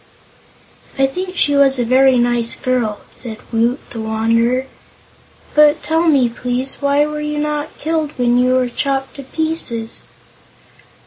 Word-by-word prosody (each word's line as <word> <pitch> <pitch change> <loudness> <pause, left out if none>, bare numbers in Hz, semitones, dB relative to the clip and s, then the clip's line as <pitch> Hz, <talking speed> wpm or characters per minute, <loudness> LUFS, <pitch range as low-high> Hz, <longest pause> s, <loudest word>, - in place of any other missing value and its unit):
"I 270 - +4
think 365 +6 -4
she 290 - +2
was 275 -1 +4
a 245 - 0
very 260 +2 +4
nice 240 -1 +1
girl," 245 -5 -1
said 225 -3 -2 0.2
Woot 235 +4 0
the 225 - -5
Wanderer. 230 +3 +1 0.9
"But, 300 +1 +4
tell 325 +2 +1
me, 275 -6 +4
please, 250 +2 -3
why 285 +1 +2
were 300 0 -4
you 300 0 -3
not 300 0 -3
killed 315 -2 -2
when 245 -1 +2
you 255 +1 +3
were 255 -1 +2
chopped 270 +2 -2
to - - -6
pieces?" 270 -7 -3
265 Hz, 145 wpm, -17 LUFS, 240-295 Hz, 0.9 s, I